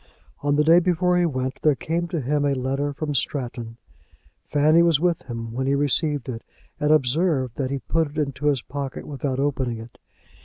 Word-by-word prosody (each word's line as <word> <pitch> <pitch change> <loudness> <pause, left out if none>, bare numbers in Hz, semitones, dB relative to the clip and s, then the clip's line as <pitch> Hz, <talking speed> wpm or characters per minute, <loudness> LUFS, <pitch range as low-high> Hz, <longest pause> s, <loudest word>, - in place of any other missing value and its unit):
On 145 0 +1
the 150 - +3
day 165 +3 +6
before 180 0 +2
he 175 -1 +3
went, 130 -3 -3
there 150 -2 +4
came 170 +5 -2
to 165 -2 -2
him 145 +3 0
a 140 -1 +2
letter 135 +3 -1
from 150 +1 -4
Stratton. 120 -4 -3 0.7
Fanny 155 +3 +4
was 170 -4 +4
with 175 -1 +1
him 115 -1 -5
when 130 +3 -2
he 140 - +2
received 145 0 +1
it, 115 -3 -5 0.4
and 150 - +1
observed 140 -3 +2
that 130 -2 -1
he 140 - -1
put 160 +3 -1
it 150 - -12
into 145 -1 -1
his 140 -5 +1
pocket 140 -1 -5
without 135 -2 -3
opening 130 -4 -1
it. 115 +1 -11
145 Hz, 195 wpm, -23 LUFS, 130-155 Hz, 0.7 s, day